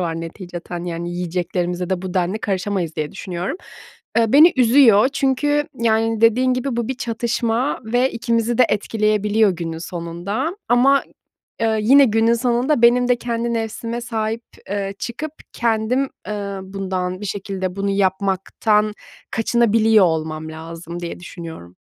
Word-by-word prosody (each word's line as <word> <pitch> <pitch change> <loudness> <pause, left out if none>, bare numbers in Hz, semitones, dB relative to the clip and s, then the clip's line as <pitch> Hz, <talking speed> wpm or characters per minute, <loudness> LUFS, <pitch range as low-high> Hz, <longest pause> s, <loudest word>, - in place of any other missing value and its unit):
var 165 -2 -2
neticeten, 175 0 -7
yani, 170 0 -4
yiyeceklerimize 180 0 -2
de 185 -1 -1
bu 185 0 -5
denli 185 +3 0
karışamayız 190 -5 -2
diye 150 -1 -3
düşünüyorum. 185 - -4 0.6
Eee, 225 -2 +2
beni 310 +5 +8
üzüyor 245 -2 +6
çünkü, 290 +2 +1
yani, 225 -1 +1
dediğin 250 +3 +4
gibi, 255 -1 -2
bu 235 -2 -2
bir 265 - -1
çatışma 235 +2 -1
ve 245 +4 +1
ikimizi 230 0 0
de 250 - +7
etkileyebiliyor 215 0 +2
günün 165 -2 -4
sonunda 175 - -4
ama, 265 +3 +5
ı - - -14 0.6
eee, 220 -1 +1
yine 275 +6 +7
günün 225 0 +3
sonunda 245 +3 +1
benim 245 +1 +5
de 245 - +4
kendi 235 0 -2
nefsime 230 +1 -3
sahip, 225 -1 -3 0.3
eee, 200 -1 -2
çıkıp 285 +6 -5 0.2
kendim, 235 +3 0 0.2
eee, 200 -2 -4
bundan 190 -1 -4
bir 210 - -6
şekilde, 190 -1 -4
bunu 200 0 -1
yapmaktan 200 +2 +1 0.4
kaçınabiliyor 225 -2 +3
olmam 160 -1 -2
lazım 165 +2 -8
diye 170 0 -6
düşünüyorum. 165 - -9
215 Hz, 140 wpm, -20 LUFS, 180-235 Hz, 0.6 s, beni